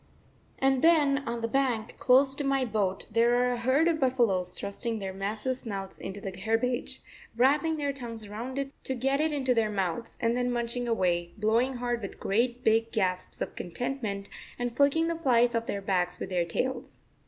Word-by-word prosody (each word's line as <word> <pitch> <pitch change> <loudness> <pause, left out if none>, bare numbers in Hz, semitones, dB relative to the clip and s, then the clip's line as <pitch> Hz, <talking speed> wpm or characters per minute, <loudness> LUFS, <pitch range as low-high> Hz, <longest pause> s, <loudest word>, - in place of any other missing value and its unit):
And 270 -1 +2
then 300 -4 +5
on 235 0 -2
the 230 - 0
bank, 245 -3 0
close 265 +2 +5
to 285 - -3
my 275 -1 +1
boat, 205 -4 -1
there 230 +2 +4
are 250 0 +2
a 245 - -1
herd 260 +7 +3
of 330 -2 +1
buffaloes 230 - +1
thrusting 225 +3 -3
their 195 -2 -4
massive 210 +6 -2
snouts 195 -5 -6
into 195 +1 -6
the 195 -2 -6
herbage, 225 +5 -1 0.3
wrapping 295 +6 +3
their 285 -2 -1
tongues 230 -5 -7
round 235 +6 -6
it 275 0 -2
to 265 - -2
get 270 +3 +1
it 315 0 +2
into 265 -3 +1
their 225 -2 +2
mouths, 195 +2 -3
and 230 -1 +1
then 245 0 0
munching 240 0 -2
away, 175 -6 0
blowing 230 +5 +2
hard 240 -1 -2
with 200 - -7
great 240 +4 0
big 225 +1 +3
gasps 185 -4 -2
of - - -3
contentment, 200 0 -4 0.3
and 245 -1 -3
flicking 285 +4 +3
the 335 -1 -2
flies 245 -5 +3
off 230 0 -1
their 200 -1 -3
backs 180 -2 0
with - - -5
their 175 -2 +1
tails. 260 +10 -3
235 Hz, 190 wpm, -28 LUFS, 205-265 Hz, 0.3 s, then